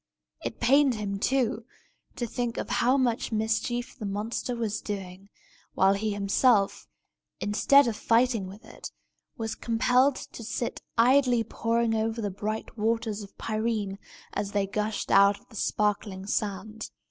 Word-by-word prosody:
It -, -, -5 dB
pained 270 Hz, +1 st, +4 dB
him, 200 Hz, -2 st, -3 dB
too, 240 Hz, -2 st, +1 dB, 0.5 s
to 240 Hz, -, -2 dB
think 235 Hz, 0 st, -3 dB
how 255 Hz, +3 st, +2 dB
much 245 Hz, -3 st, 0 dB
mischief 220 Hz, +3 st, -1 dB
the 215 Hz, -5 st, -5 dB
monster 215 Hz, +5 st, -3 dB
was 220 Hz, -3 st, -2 dB
doing, 195 Hz, -1 st, -6 dB, 0.5 s
while 195 Hz, +1 st, +5 dB
he 210 Hz, +2 st, -1 dB
himself, 200 Hz, +1 st, +2 dB, 0.5 s
instead 275 Hz, +7 st, +4 dB
of 220 Hz, -2 st, -4 dB
righting 230 Hz, -4 st, +3 dB
with 200 Hz, +3 st, -12 dB
it, -, -, -9 dB, 0.5 s
was 225 Hz, -1 st, -3 dB
compelled 250 Hz, +4 st, +2 dB
to 235 Hz, -, -9 dB
sit 235 Hz, +2 st, -3 dB, 0.2 s
idly 250 Hz, 0 st, +4 dB
poring 230 Hz, +1 st, 0 dB
over 225 Hz, +1 st, -1 dB
the 205 Hz, -3 st, -2 dB
bright 215 Hz, +3 st, -5 dB
waters 225 Hz, -1 st, 0 dB
of 200 Hz, -, -12 dB
Pirene, 215 Hz, -3 st, -2 dB, 0.3 s
as 200 Hz, 0 st, -3 dB
they 200 Hz, -1 st, +2 dB
gushed 210 Hz, +2 st, -2 dB
out 200 Hz, +1 st, +6 dB
of -, -, -29 dB
the 225 Hz, -, -15 dB
sparkling 205 Hz, -2 st, -1 dB
sand. 210 Hz, +2 st, -3 dB
220 Hz, 145 wpm, -27 LUFS, 205-235 Hz, 0.5 s, out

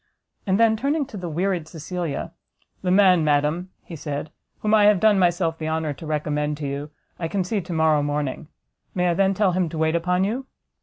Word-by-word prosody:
And 190 Hz, +2 st, +2 dB
then, 225 Hz, -1 st, +5 dB
turning 280 Hz, +6 st, 0 dB
to 255 Hz, -, -12 dB
the 180 Hz, -3 st, -5 dB
wearied 175 Hz, 0 st, -1 dB
Cecilia, 165 Hz, 0 st, -4 dB, 0.5 s
"The 185 Hz, -, -1 dB
man, 185 Hz, -3 st, +5 dB
madam," 150 Hz, +4 st, +1 dB
he 170 Hz, -, -9 dB
said, 150 Hz, 0 st, -5 dB, 0.3 s
"whom 215 Hz, 0 st, +1 dB
I 210 Hz, -1 st, +6 dB
have 205 Hz, -2 st, +5 dB
done 210 Hz, -1 st, +4 dB
myself 175 Hz, -2 st, +1 dB
the 160 Hz, 0 st, -3 dB
honour 160 Hz, -2 st, -1 dB
to 160 Hz, +3 st, -10 dB
recommend 150 Hz, -1 st, -1 dB
to 145 Hz, -1 st, -4 dB
you, 140 Hz, +2 st, -4 dB, 0.3 s
I 165 Hz, -, -2 dB
can 195 Hz, +2 st, -1 dB
see 200 Hz, +3 st, -1 dB
to 180 Hz, +1 st, -9 dB
morrow 160 Hz, -2 st, +3 dB
morning; 145 Hz, 0 st, -2 dB, 0.5 s
may 180 Hz, -1 st, +2 dB
I -, -, +2 dB
then 195 Hz, +2 st, +2 dB
tell 200 Hz, -1 st, +3 dB
him 180 Hz, -2 st, 0 dB
to 160 Hz, -, -6 dB
wait 160 Hz, 0 st, +1 dB
upon 180 Hz, +2 st, +1 dB
you?" 245 Hz, +7 st, -2 dB
175 Hz, 210 wpm, -23 LUFS, 155-195 Hz, 0.5 s, I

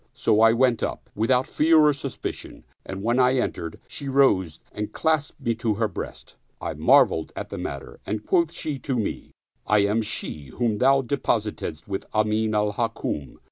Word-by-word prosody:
So 105 Hz, -, +2 dB
I 115 Hz, 0 st, +7 dB
went 120 Hz, 0 st, +2 dB
up, -, -, -4 dB
without 125 Hz, +4 st, +2 dB
fear 160 Hz, +1 st, +3 dB
or 150 Hz, -1 st, +6 dB
suspicion, 140 Hz, -2 st, -7 dB, 0.2 s
and 95 Hz, +1 st, -6 dB
when 120 Hz, +3 st, +2 dB
I 125 Hz, +1 st, +4 dB
entered, 85 Hz, -9 st, -2 dB
she 140 Hz, -2 st, -6 dB
rose 100 Hz, -, +3 dB
and 105 Hz, 0 st, -4 dB
clasped 155 Hz, -3 st, 0 dB
me 115 Hz, -, 0 dB
to 115 Hz, -1 st, -1 dB
her 110 Hz, +1 st, +1 dB
breast. -, -, -8 dB, 0.2 s
I -, -, -4 dB
marveled 80 Hz, -, +4 dB
at -, -, -5 dB
the -, -, -6 dB
matter 70 Hz, -1 st, -6 dB
and 105 Hz, +1 st, -4 dB
quoth 170 Hz, -3 st, +2 dB
she 150 Hz, -4 st, -4 dB
to 130 Hz, -2 st, -2 dB
me, 110 Hz, -, -3 dB, 0.2 s
" -, -, -41 dB
I 100 Hz, -, +4 dB
am 105 Hz, +3 st, +1 dB
she 105 Hz, -8 st, -5 dB
whom 115 Hz, -4 st, 0 dB
thou 135 Hz, +1 st, +4 dB
depositedst 110 Hz, -, -2 dB
with 95 Hz, -1 st, -4 dB
Amin 110 Hz, 0 st, +1 dB
al 105 Hz, 0 st, +1 dB
Hukm." 110 Hz, -, -3 dB
115 Hz, 180 wpm, -24 LUFS, 105-135 Hz, 0.2 s, I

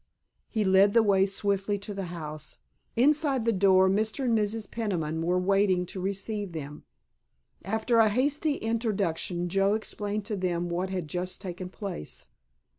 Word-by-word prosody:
He 215 Hz, -3 st, 0 dB
led 195 Hz, +2 st, +5 dB
the 230 Hz, -, +6 dB
way 195 Hz, -2 st, +4 dB
swiftly 200 Hz, +1 st, -1 dB
to 200 Hz, +1 st, -6 dB
the 195 Hz, -1 st, -4 dB
house. 155 Hz, -3 st, -6 dB, 0.4 s
Inside 275 Hz, -1 st, +3 dB
the 230 Hz, -, +3 dB
door 190 Hz, -1 st, +5 dB
Mr. 215 Hz, +7 st, 0 dB
and 235 Hz, -2 st, +3 dB
Mrs. 215 Hz, -1 st, -1 dB
Peniman 165 Hz, -8 st, -2 dB
were 175 Hz, +2 st, +1 dB
waiting 190 Hz, -1 st, +2 dB
to 185 Hz, +1 st, -7 dB
receive 200 Hz, 0 st, -3 dB
them. 150 Hz, -2 st, -7 dB, 0.8 s
After 220 Hz, +3 st, +1 dB
a 220 Hz, -1 st, +6 dB
hasty 285 Hz, +6 st, +1 dB
introduction 200 Hz, -7 st, -1 dB
Joe 195 Hz, +3 st, +2 dB
explained 210 Hz, -1 st, -3 dB
to 210 Hz, 0 st, -2 dB
them 175 Hz, -2 st, -1 dB
what 180 Hz, +2 st, -2 dB
had 185 Hz, -4 st, -3 dB
just 180 Hz, +4 st, -3 dB
taken 180 Hz, -1 st, -6 dB
place. 190 Hz, -, -6 dB
195 Hz, 155 wpm, -28 LUFS, 180-220 Hz, 0.8 s, the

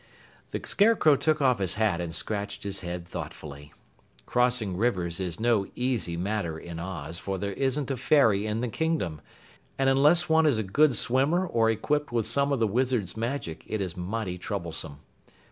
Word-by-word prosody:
The -, -, -3 dB
Scarecrow 200 Hz, -8 st, +4 dB
took 155 Hz, +1 st, +1 dB
off 125 Hz, -4 st, +3 dB
his 95 Hz, -3 st, 0 dB
hat 105 Hz, -5 st, +1 dB
and 85 Hz, -1 st, -4 dB
scratched 100 Hz, +3 st, -4 dB
his 100 Hz, -1 st, -3 dB
head 85 Hz, -1 st, -6 dB
thoughtfully. 75 Hz, -3 st, -8 dB, 0.5 s
Crossing 125 Hz, -6 st, +1 dB
rivers 90 Hz, -5 st, 0 dB
is 90 Hz, -2 st, -3 dB
no 110 Hz, -4 st, +2 dB
easy 120 Hz, -9 st, -1 dB
matter 90 Hz, -3 st, -2 dB
in 85 Hz, 0 st, -8 dB
Oz, 85 Hz, -2 st, -5 dB
for 95 Hz, 0 st, -3 dB
there 100 Hz, +1 st, -3 dB
isn't 135 Hz, +3 st, 0 dB
a 135 Hz, -, -2 dB
ferry 110 Hz, -7 st, +3 dB
in 110 Hz, +2 st, -1 dB
the 125 Hz, -, -1 dB
Kingdom, 115 Hz, -, -1 dB, 0.6 s
and 135 Hz, 0 st, +3 dB
unless 150 Hz, +6 st, +4 dB
one 160 Hz, 0 st, +4 dB
is 140 Hz, -7 st, +3 dB
a 110 Hz, -, 0 dB
good 135 Hz, +8 st, +3 dB
swimmer 140 Hz, -, +2 dB
or 115 Hz, -9 st, +2 dB
equipped 145 Hz, +7 st, 0 dB
with 115 Hz, -3 st, 0 dB
some 140 Hz, +5 st, +1 dB
of 140 Hz, -, +2 dB
the 115 Hz, -, +3 dB
Wizard's 115 Hz, -4 st, 0 dB
magic 115 Hz, -, -4 dB
it 110 Hz, -, -2 dB
is 95 Hz, -3 st, -3 dB
mighty 90 Hz, 0 st, -4 dB
troublesome. 85 Hz, -7 st, -5 dB
110 Hz, 180 wpm, -27 LUFS, 90-130 Hz, 0.6 s, Scarecrow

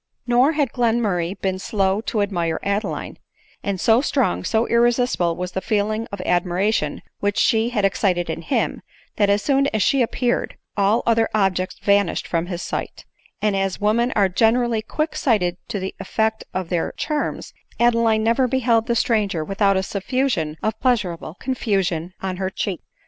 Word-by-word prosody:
Nor 250 Hz, +5 st, +4 dB
had 290 Hz, -6 st, 0 dB
Glenmurray 210 Hz, -7 st, 0 dB
been 190 Hz, -1 st, -1 dB
slow 195 Hz, 0 st, 0 dB
to 210 Hz, -3 st, +1 dB
admire 170 Hz, -5 st, -1 dB
Adeline; 200 Hz, +2 st, -2 dB, 0.4 s
and 200 Hz, -2 st, -2 dB
so 230 Hz, +3 st, +4 dB
strong, 90 Hz, -, 0 dB
so 225 Hz, +1 st, +1 dB
irresistible 235 Hz, -7 st, +2 dB
was 180 Hz, +1 st, -4 dB
the 190 Hz, -, -3 dB
feeling 215 Hz, +2 st, -1 dB
of 200 Hz, -, -6 dB
admiration 180 Hz, +4 st, 0 dB, 0.2 s
which 205 Hz, 0 st, -1 dB
she 225 Hz, +1 st, +3 dB
had 210 Hz, -5 st, 0 dB
excited 185 Hz, -3 st, +1 dB
in -, -, -4 dB
him, -, -, -1 dB, 0.4 s
that 205 Hz, -1 st, +3 dB
as 205 Hz, +1 st, +2 dB
soon 275 Hz, -1 st, +2 dB
as 215 Hz, -7 st, 0 dB
she 275 Hz, -, +3 dB
appear 245 Hz, +1 st, +1 dB
ed, -, -, -8 dB, 0.2 s
all 205 Hz, +3 st, +2 dB
other 230 Hz, -1 st, +3 dB
objects 190 Hz, -3 st, 0 dB
vanished 200 Hz, -2 st, +2 dB
from 170 Hz, 0 st, -1 dB
his 175 Hz, -1 st, -4 dB
sight; -, -, -5 dB, 0.4 s
and 210 Hz, -2 st, +2 dB
as 195 Hz, -1 st, -1 dB
wo 210 Hz, +1 st, +2 dB
men 235 Hz, +2 st, +1 dB
are 200 Hz, -2 st, +3 dB
generally 225 Hz, +4 st, +2 dB
quick 305 Hz, +8 st, -3 dB
sighted 180 Hz, -9 st, +1 dB
to 220 Hz, -4 st, -3 dB
the 190 Hz, 0 st, -4 dB
effect 220 Hz, 0 st, -1 dB
of 185 Hz, -2 st, -3 dB
their 175 Hz, -2 st, -1 dB
charms, 300 Hz, -1 st, -3 dB, 0.3 s
Adeline 230 Hz, -2 st, +3 dB
never 235 Hz, +3 st, +3 dB
beheld 235 Hz, -3 st, +2 dB
the 235 Hz, -, +1 dB
stranger 205 Hz, -9 st, +1 dB
without 195 Hz, +1 st, +2 dB
a 190 Hz, -, 0 dB
suf 195 Hz, 0 st, -5 dB
fusion 235 Hz, -, 0 dB
of 220 Hz, 0 st, -1 dB
pleasurable 195 Hz, -10 st, -1 dB
confusion 190 Hz, -9 st, -1 dB
on 185 Hz, -1 st, -2 dB
her 190 Hz, 0 st, -1 dB
cheek. 190 Hz, -2 st, -3 dB
210 Hz, 175 wpm, -22 LUFS, 185-235 Hz, 0.4 s, Nor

